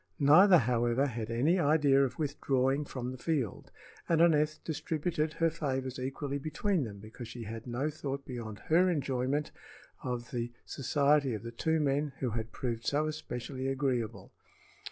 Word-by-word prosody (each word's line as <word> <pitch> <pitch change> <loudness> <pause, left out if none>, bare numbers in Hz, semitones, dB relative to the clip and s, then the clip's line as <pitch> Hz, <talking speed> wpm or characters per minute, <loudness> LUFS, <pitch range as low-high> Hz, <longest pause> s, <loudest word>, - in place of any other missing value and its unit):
Neither, 175 +7 +7
however, 120 0 +2
had 115 -4 -4
any 145 +11 +2
idea 145 -3 +4
of 135 - -2
withdrawing 140 -2 0
from 125 -2 -5
the 130 - -8
field, 140 - -2 0.4
and 165 -2 +3
Aneth 155 -2 +4
distributed 155 0 -2
her 165 -1 +1
favors 130 -5 -3
equally 135 +2 -3
between 155 +2 0
them 100 -3 -8
because 110 +4 -9
she 115 0 -7
had 115 +2 -7
no 130 +6 -1
thought 140 -2 -5
beyond 115 -5 -6
her 175 +4 +4
enjoyment 140 -2 -1 0.5
of 125 +2 -4
the 120 -2 -3
society 140 -1 +2
of 105 - -7
the 115 - -6
two 160 +7 0
men 145 0 0
who 125 -3 -2
had 110 0 -4
proved 115 -2 -3
so 150 +2 +1
especially 135 -3 -4
agreeable. 130 -5 -1
135 Hz, 155 wpm, -31 LUFS, 120-150 Hz, 0.5 s, Neither